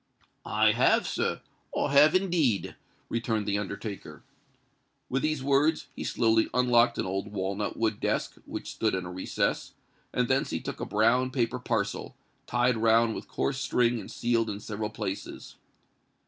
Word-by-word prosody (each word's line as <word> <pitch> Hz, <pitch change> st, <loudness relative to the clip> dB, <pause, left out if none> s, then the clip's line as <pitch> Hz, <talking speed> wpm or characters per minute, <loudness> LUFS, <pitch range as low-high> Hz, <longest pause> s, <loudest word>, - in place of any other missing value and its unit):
"I -, -, +4 dB
have, -, -, +3 dB
sir—I 140 Hz, -, -3 dB
have 150 Hz, +3 st, +6 dB
indeed," 170 Hz, -, +1 dB, 0.3 s
returned 115 Hz, -2 st, -1 dB
the 100 Hz, 0 st, 0 dB
undertaker. 100 Hz, 0 st, -6 dB, 0.9 s
With 135 Hz, +1 st, 0 dB
these 155 Hz, -3 st, -1 dB
words, 140 Hz, +3 st, +2 dB
he -, -, -5 dB
slowly 110 Hz, -1 st, +2 dB
unlocked 120 Hz, -1 st, +4 dB
an -, -, -1 dB
old 95 Hz, +3 st, -3 dB
walnut 100 Hz, +1 st, -3 dB
wood 110 Hz, -2 st, 0 dB
desk, -, -, -1 dB
which -, -, -6 dB
stood 110 Hz, -3 st, 0 dB
in 95 Hz, -1 st, -3 dB
a 90 Hz, -, -6 dB
recess; 95 Hz, +1 st, -2 dB, 0.4 s
and 125 Hz, -1 st, +1 dB
thence 135 Hz, +3 st, +1 dB
he 80 Hz, -, -2 dB
took -, -, -6 dB
a -, -, -3 dB
brown 115 Hz, +5 st, +2 dB
paper 125 Hz, -1 st, -1 dB
parcel, 115 Hz, -5 st, -2 dB, 0.3 s
tied 120 Hz, 0 st, +2 dB
round 115 Hz, 0 st, +4 dB
with -, -, -7 dB
coarse 135 Hz, -1 st, -2 dB
string 120 Hz, -2 st, +1 dB
and -, -, -9 dB
sealed 115 Hz, -2 st, 0 dB
in 100 Hz, -1 st, -4 dB
several 105 Hz, 0 st, -4 dB
places. 105 Hz, -2 st, -6 dB
115 Hz, 155 wpm, -28 LUFS, 105-125 Hz, 0.9 s, have